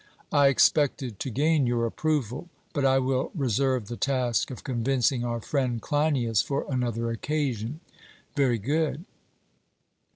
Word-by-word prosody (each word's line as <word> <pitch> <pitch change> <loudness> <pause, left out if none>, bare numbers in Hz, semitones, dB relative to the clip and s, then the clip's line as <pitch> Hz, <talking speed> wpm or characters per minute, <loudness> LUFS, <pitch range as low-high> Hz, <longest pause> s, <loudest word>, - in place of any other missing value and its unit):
I 145 -1 +5
expected 135 -4 +2
to - - -3
gain 145 +2 +2
your 120 -1 +1
approval; 145 +3 -2 0.2
but 145 -4 -1
I 135 0 +4
will 130 0 0
reserve 130 - 0
the 120 - -5
task 130 -4 0
of 130 - -8
convincing 125 0 0
our 120 -1 -2
friend 125 -1 -1
Cleinias 140 -7 +1
for 140 0 -2
another 120 -3 -1
occasion. 135 +1 -2 0.5
'Very 135 -5 +2
good.' 155 - -1
130 Hz, 130 wpm, -27 LUFS, 120-145 Hz, 0.5 s, I